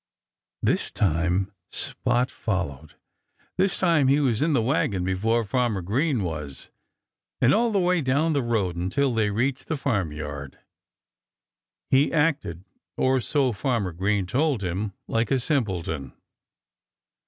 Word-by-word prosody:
This - - +1
time 90 +1 0 0.2
Spot 125 +1 -1
followed. 80 - -3 0.6
This 190 +1 +2
time 165 -7 +3
he 140 +2 +4
was 125 -5 +1
in 155 +1 +2
the 125 - +3
wagon 125 - +1
before 110 +6 +1
Farmer 110 -3 0
Green 125 - 0
was. 75 -5 -6 0.7
And 125 - +4
all 235 +1 +3
the 205 - +1
way 180 -2 +2
down 145 +4 +1
the 140 - +1
road, 110 -7 0
until 120 +10 0
they 110 -2 +1
reached 125 +6 -1
the 160 - -1
farmyard, 75 - -3 1.3
he 135 +2 +4
acted 145 - 0 0.3
(or 130 0 +3
so 135 +1 +1
Farmer 115 -4 -1
Green 95 +3 0
told 130 - 0
him!) 95 +3 -2
like 115 +1 0
a 135 - +2
simpleton. 95 - -2
115 Hz, 130 wpm, -25 LUFS, 95-140 Hz, 1.3 s, he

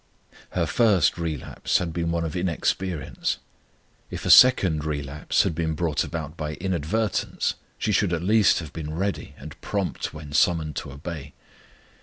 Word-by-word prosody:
Her - - +1
first 105 -7 +3
relapse 80 -5 -1
had 85 -2 -3
been 85 -1 -1
one 85 0 0
of 80 - -4
inexperience; 90 -2 -1 0.7
if - - -6
a - - +4
second 95 -12 +7
relapse 75 -1 0
had - - -1
been 80 0 -1
brought 80 -2 0
about 80 -1 -5
by 75 -2 -4
inadvertence 95 +5 -1 0.2
she - - -1
should 100 -2 +2
at 85 -1 -1
least 105 +1 +4
have 80 -4 -6
been 80 -1 -5
ready 100 +3 -3
and - - -11
prompt 100 -3 -2
when 75 -2 -9
summoned 80 -1 +2
to - - -5
obey. 75 0 -7
85 Hz, 155 wpm, -25 LUFS, 75-95 Hz, 0.7 s, second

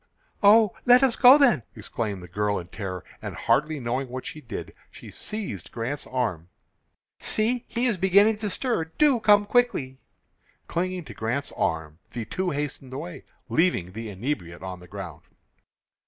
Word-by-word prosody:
"Oh, 210 0 +6
let 245 +2 +7
us 260 -3 +3
go 260 +2 +8
then," 245 - +4
exclaimed 105 -3 -4
the - - -9
girl 100 +3 -1
in 90 0 -7
terror, 95 -3 -6 0.2
and, - - -6
hardly 150 +1 +1
knowing 125 +2 -2
what 130 +1 -6
she 155 - -7
did, 120 -6 -7 0.2
she - - -12
seized 195 - -6
Grant's 125 +5 -4
arm. 100 -10 -2 0.7
"See, 230 +3 0
he 240 +1 -1
is 230 -7 +1
beginning 200 +4 +5
to 210 -1 -3
stir. 230 -6 0
Do 260 - +2
come 205 -2 +5
quickly!" 205 - +1 0.7
Clinging 180 +1 -2
to - - -9
Grant's 120 +6 -2
arm, 80 -1 -2
the 120 -2 -4
two 185 +10 -2
hastened 140 -3 -4
away, 110 -9 -7 0.2
leaving 160 - +1
the 110 +3 -6
inebriate 95 - -4
on 95 -1 -6
the 90 - -14
ground. - - -8
140 Hz, 160 wpm, -25 LUFS, -, 0.7 s, go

